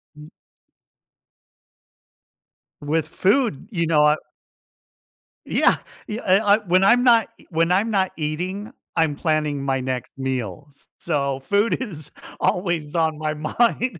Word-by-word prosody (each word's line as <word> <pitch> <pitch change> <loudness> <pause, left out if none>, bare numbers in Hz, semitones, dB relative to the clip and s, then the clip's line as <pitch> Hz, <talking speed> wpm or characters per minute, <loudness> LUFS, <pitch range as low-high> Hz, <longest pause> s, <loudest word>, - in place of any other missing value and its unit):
Mm. 150 0 -12 2.5
With 155 +1 -1
food, 200 - +1
you 170 -4 -1
know 150 -2 +4
I 150 +1 +4 1.3
Yeah, - - +3 0.3
yeah, 215 +2 -4
I 200 +2 +4
I, - - 0
when 185 -2 +2
I'm 240 +5 +5
not 230 -4 +5 0.2
when 165 +1 +1
I'm 200 +5 +2
not 190 -3 +1
eating, 180 +8 -4 0.2
I'm 160 -3 +1
planning 150 -2 -1
my 135 -1 0
next 130 -2 -4
meals. 130 +1 -5
So 140 -4 -1
food 205 - +1
is 155 - -7 0.3
always 175 -4 -1
on 160 -2 +1
my 155 0 -2
mind. 220 +6 0
165 Hz, 125 wpm, -22 LUFS, 150-200 Hz, 2.5 s, I'm